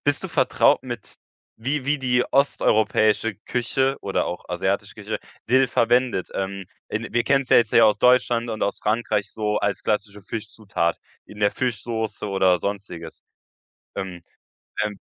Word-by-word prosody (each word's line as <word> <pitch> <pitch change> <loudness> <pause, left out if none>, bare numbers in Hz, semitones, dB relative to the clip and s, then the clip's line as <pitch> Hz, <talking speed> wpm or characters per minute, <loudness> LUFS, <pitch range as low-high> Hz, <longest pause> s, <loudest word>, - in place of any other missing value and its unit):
Bist 145 0 +1
du - - -3
vertraut - - +3
mit - - -7 0.5
wie 135 +1 -1
wie 150 +1 +1
die 125 -2 +2
osteuropäische 110 -5 +2
Küche 130 +5 -1
oder 95 - -1
auch 90 - -5
asiatische 95 +3 -1
Küche, 105 0 -4 0.3
Dill 130 +2 +5
verwendet? 120 -3 +2
Ähm, 95 0 -3 0.2
in 110 +2 -4
wir 120 - +2
kennen 135 0 +3
's - - -17
ja - - +7
jetzt 115 -3 +2
hier 115 - +6
aus 105 - +3
Deutschland 120 -1 +3
und 110 -1 -3
aus 100 - 0
Frankreich 105 -2 0
so 105 -1 -1
als 100 -2 -1
klassische 105 -1 -2
Fischzutat 105 -5 -3 0.3
in 105 - -13
der 100 - +4
Fischsoße 115 -2 -3
oder 95 -3 +3
sonstiges. 90 -5 -6 0.7
Ähm, 95 -3 -5 0.6
ähm 105 -2 -4
110 Hz, 155 wpm, -23 LUFS, 100-125 Hz, 0.7 s, ja